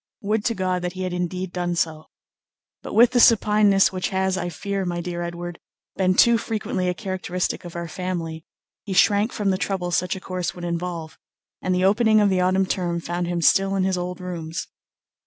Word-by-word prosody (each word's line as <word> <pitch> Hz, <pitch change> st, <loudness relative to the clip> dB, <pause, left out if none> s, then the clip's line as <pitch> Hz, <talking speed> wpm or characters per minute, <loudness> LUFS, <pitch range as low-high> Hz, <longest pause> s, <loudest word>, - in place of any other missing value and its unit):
Would 210 Hz, +1 st, 0 dB
to 230 Hz, -, +1 dB
God 185 Hz, -2 st, -1 dB
that 180 Hz, 0 st, -3 dB
he 185 Hz, 0 st, -5 dB
had 185 Hz, -1 st, -3 dB
indeed 180 Hz, +1 st, -3 dB
done 175 Hz, -1 st, -1 dB
so! 160 Hz, -2 st, -2 dB, 0.7 s
but -, -, -7 dB
with 235 Hz, +2 st, +7 dB
the 250 Hz, -, +3 dB
supineness 210 Hz, -4 st, +5 dB
which 185 Hz, -1 st, -2 dB
has, 190 Hz, 0 st, 0 dB
I 175 Hz, -1 st, -2 dB
fear, 195 Hz, +4 st, -3 dB
my 175 Hz, -1 st, -2 dB
dear 175 Hz, 0 st, -4 dB
Edward, 175 Hz, 0 st, -5 dB, 0.4 s
been 185 Hz, -1 st, +2 dB
too 235 Hz, +2 st, +5 dB
frequently 210 Hz, -5 st, -2 dB
a 180 Hz, -, -2 dB
characteristic 185 Hz, -3 st, -3 dB
of 175 Hz, -, -9 dB
our 170 Hz, 0 st, -4 dB
family, 165 Hz, -2 st, -4 dB, 0.4 s
he 200 Hz, -, -4 dB
shrank 205 Hz, +4 st, +4 dB
from 205 Hz, -3 st, 0 dB
the 185 Hz, -, -1 dB
trouble 185 Hz, -3 st, -2 dB
such 180 Hz, +1 st, 0 dB
a -, -, -6 dB
course 180 Hz, -2 st, -4 dB
would 175 Hz, -1 st, -6 dB
involve, 170 Hz, -2 st, -4 dB, 0.4 s
and 185 Hz, 0 st, 0 dB
the 180 Hz, +1 st, +2 dB
opening 215 Hz, +2 st, +4 dB
of 205 Hz, -2 st, +3 dB
the 185 Hz, -1 st, +2 dB
autumn 185 Hz, +1 st, +2 dB
term 175 Hz, -3 st, -1 dB
found 175 Hz, +1 st, -3 dB
him 175 Hz, -1 st, -2 dB
still 195 Hz, +6 st, +4 dB
in 190 Hz, -, +1 dB
his 190 Hz, 0 st, +1 dB
old 180 Hz, 0 st, -4 dB
rooms. 170 Hz, -3 st, -5 dB
185 Hz, 205 wpm, -23 LUFS, 175-195 Hz, 0.7 s, with